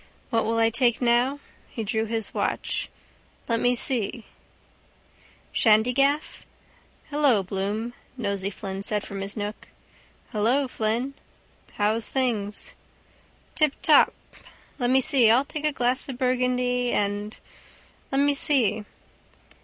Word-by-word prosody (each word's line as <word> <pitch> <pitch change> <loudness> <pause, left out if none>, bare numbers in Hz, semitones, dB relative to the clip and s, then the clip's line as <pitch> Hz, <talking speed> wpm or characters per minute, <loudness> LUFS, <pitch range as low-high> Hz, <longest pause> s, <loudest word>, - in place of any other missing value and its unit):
What 230 -2 +1
will 225 +1 0
I 225 0 +3
take 240 0 +2
now? 245 +3 +2 0.3
He 225 - -5
drew 220 +1 -1
his 225 -1 -3
watch. - - -2 0.6
Let 230 -1 +1
me 245 +1 +2
see 235 -4 +2
now. 230 - -11 1.3
Shandygaff? 250 +7 +2 0.7
—Hello, 280 -9 +3
Bloom, 205 +5 -3 0.2
Nosey 200 -4 -2
Flynn 195 -1 -6
said 210 0 -1
from 195 -1 -6
his 200 +3 -5
nook. 205 +1 -5 0.6
—Hello, 245 +6 +1
Flynn. 235 +3 -2 0.6
—How's 215 +2 +1
things? 220 -6 -2 0.8
—Tiptop... 305 -3 +4 0.7
Let 245 -1 +1
me 265 +1 +4
see. 260 -5 +4
I'll 250 +5 +4
take 305 +1 -5
a 305 - +3
glass 255 0 0
of 260 - -5
burgundy 250 -1 0
and... 205 +1 -2 0.7
let 270 +1 +2
me 285 0 +3
see. 225 -7 +1
235 Hz, 120 wpm, -25 LUFS, 210-260 Hz, 1.3 s, Tiptop